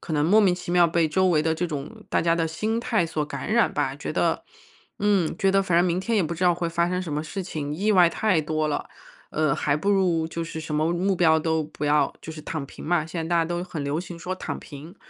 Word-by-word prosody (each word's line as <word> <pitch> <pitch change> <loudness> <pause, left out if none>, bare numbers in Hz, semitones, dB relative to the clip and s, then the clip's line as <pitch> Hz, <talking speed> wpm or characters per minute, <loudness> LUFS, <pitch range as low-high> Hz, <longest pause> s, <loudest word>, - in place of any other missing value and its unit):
可 160 - -4
能 150 0 +2
莫 210 +7 +5
名 190 -3 +4
其 180 -1 -7
妙， 175 -1 +6
被 165 -1 +2
周 185 +4 +2
围 155 -3 +3
的 160 0 +1
这 175 +2 -1
种 165 +8 -7
大 - - +1
家 165 0 +3
的 165 -1 0
心 215 +8 -2
态 220 -6 +1
所 160 -2 -2
感 180 - -4
染 235 - +3
吧， - - 0
觉 - - -6
得 - - +1 0.5
嗯， 200 -5 +1
觉 195 -1 +2
得 195 0 +4
反 180 -3 +1
正 175 - +4
明 175 0 0
天 225 +4 -1
也 200 - +3
不 170 +1 -2
知 180 - -5
道 175 -1 +4
会 170 0 -2
发 170 +1 +1
生 180 0 -1
什 165 -5 -5
么 150 - -1
事 175 +5 -5
情， 150 -5 -4
意 205 +6 +1
外 180 -3 +6
太 190 0 +1
多 155 0 -1
了， 145 - -2 0.4
呃， 155 -3 +1
还 145 - 0
不 180 +7 -2
如 175 -5 +2
就 165 0 -4
是 160 -1 -6
什 155 -1 -5
么 155 +3 +1
目 185 +2 0
标 160 -2 +4
都 160 0 0
不 150 -1 -7
要， 145 -1 +3
就 - - -8
是 155 - -9
躺 155 -2 -4
平 - - -11
嘛， 165 -1 +1
现 165 0 -4
在 - - -6
大 170 - +2
家 165 - +3
都 175 +1 -3
很 165 -5 -5
流 140 +2 -1
行 175 -1 -8
说 180 +2 -4
躺 - - -5
平。 155 +6 -11
170 Hz, 300 characters per minute, -25 LUFS, 155-185 Hz, 0.5 s, 妙